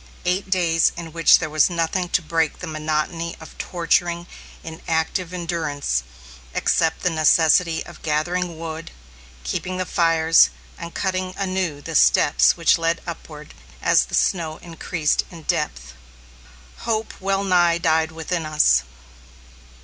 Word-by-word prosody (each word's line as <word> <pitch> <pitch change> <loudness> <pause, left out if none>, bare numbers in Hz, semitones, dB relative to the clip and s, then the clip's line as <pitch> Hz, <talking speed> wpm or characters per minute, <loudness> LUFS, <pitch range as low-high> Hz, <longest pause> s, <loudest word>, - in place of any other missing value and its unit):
Eight 185 +2 -1
days, 170 -3 +2
in 165 -2 -7
which 165 -1 +6
there 160 - -3
was 155 +3 +3
nothing 175 +1 -1
to 175 - +1
break 160 -1 0
the - - -7
monotony 155 +2 -3
of 160 - -12
torturing, 170 0 0 0.4
inactive 160 +2 -3
endurance, 160 - -2 0.5
except 165 -1 +1
the 180 - +2
necessity 160 +1 +3
of - - -13
gathering 170 +3 -1
wood, 165 0 -6 0.5
keeping 180 - -3
the 185 - -2
fires, 165 - +4 0.3
and 170 0 -9
cutting 185 -1 -2
anew 185 -6 -2
the 165 - -7
steps 145 +1 +4
which 165 0 +3
led 165 0 0
upward, 155 -3 -9 0.3
as - - +3
the - - -4
snow 160 -4 0
increased 165 -2 -1
in 165 -3 -12
depth. 60 - -2 0.8
Hope 220 -1 -2
well 195 +1 0
nigh 175 -3 +3
died 160 -1 +1
within 165 +1 -3
us. 150 - +3
165 Hz, 135 wpm, -22 LUFS, 160-180 Hz, 0.8 s, which